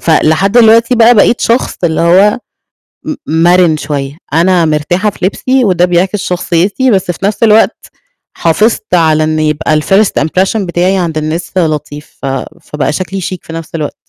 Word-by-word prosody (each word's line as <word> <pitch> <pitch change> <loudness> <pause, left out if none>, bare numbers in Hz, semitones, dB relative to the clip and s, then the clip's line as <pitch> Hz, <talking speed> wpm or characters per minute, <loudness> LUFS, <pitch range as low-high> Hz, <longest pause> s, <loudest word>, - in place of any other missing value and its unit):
فلحد 165 +6 +1
الوقتي 230 +1 +4
بقى 235 +1 +5
بقيت 225 +2 +3
شخص 235 +3 0
اللي 160 -2 0
هو 190 +7 +3 0.7
م 305 - -4
مَرِن 170 0 +2
شوية، 145 -1 -5 0.2
أنا 170 +1 +2
مرتاحة 160 +7 0
في 190 - -5
لبسي 255 +5 0
وده 180 -2 +2
بيعكس 180 +3 0
شخصيّتي، 185 +8 -1
بس 190 -3 0
في 175 - -11
نفْس 205 +2 -1
الوقت 220 0 +2 0.5
حافظت 210 +5 0
على 160 -2 +2
إن 155 0 -1
يبقى 155 0 0
الfirst 195 +6 +1
impression 185 +7 0
بتاعي 185 -1 -1
عند 170 -4 -2
الناس 155 +3 -4
لطيف، 150 -3 -3
ف - - -5 0.4
فبقى 150 -3 -3
شكلي 190 +3 -4
chic 185 +1 -4
في 165 - -11
نفْس 165 0 -8
الوقت. 150 -3 -4
175 Hz, 160 wpm, -11 LUFS, 160-200 Hz, 0.7 s, بقى